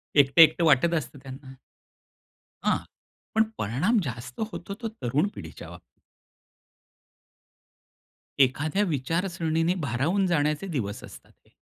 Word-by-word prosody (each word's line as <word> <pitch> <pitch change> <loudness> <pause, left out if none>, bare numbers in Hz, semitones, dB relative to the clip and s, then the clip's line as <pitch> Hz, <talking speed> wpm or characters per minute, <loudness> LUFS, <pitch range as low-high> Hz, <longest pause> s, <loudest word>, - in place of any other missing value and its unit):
एकटं-एकटं 145 +4 +6
वाटत 160 +3 +4
असतं 140 -3 -3
त्यांना. 135 0 -10 1.1
हां. - - +2 0.6
पण 220 - +5
परिणाम 160 - +1
जास्त 125 0 -7
होतो, 200 +1 -6
तो 230 - -2
तरुण 150 - -1
पिढीच्या - - -9
बाब - - -11 2.6
एखाद्या 145 +9 +2
विचारसरणीने 165 +1 0
भारावून 150 +9 0
जाण्याचे 150 +1 0
दिवस 110 - -4
असतात - - -13
ते. - - -32
150 Hz, 105 wpm, -26 LUFS, 130-175 Hz, 2.6 s, एकटं-एकटं